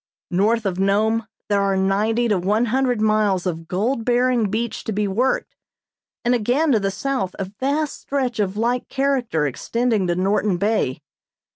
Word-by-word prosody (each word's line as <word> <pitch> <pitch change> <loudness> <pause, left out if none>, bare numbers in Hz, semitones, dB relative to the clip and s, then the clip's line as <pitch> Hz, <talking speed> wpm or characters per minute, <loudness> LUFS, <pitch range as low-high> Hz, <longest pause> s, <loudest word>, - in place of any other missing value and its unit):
North 215 +5 +2
of 185 -2 -1
Nome 215 +3 +1 0.2
there 200 -1 +2
are 195 -1 +1
ninety 210 +5 +1
to 205 -4 +1
one 210 +6 +1
hundred 255 -3 +1
miles 215 -4 +2
of 165 -2 -3
gold 225 +8 -1
bearing 245 -2 +2
beach 225 +3 -3
to - - -2
be 210 0 0
worked, 240 +7 0 0.7
and 240 - +3
again 250 +7 +2
to 225 - +4
the 195 -1 0
south 200 -3 -2
a 195 - -2
vast 275 +9 -2
stretch 260 -5 -2
of 200 -1 -1
like 240 +3 0
character 260 - 0
extending 220 - 0
to 175 - +1
Norton 195 +1 +1
Bay. 200 - 0
215 Hz, 165 wpm, -21 LUFS, 195-245 Hz, 0.7 s, to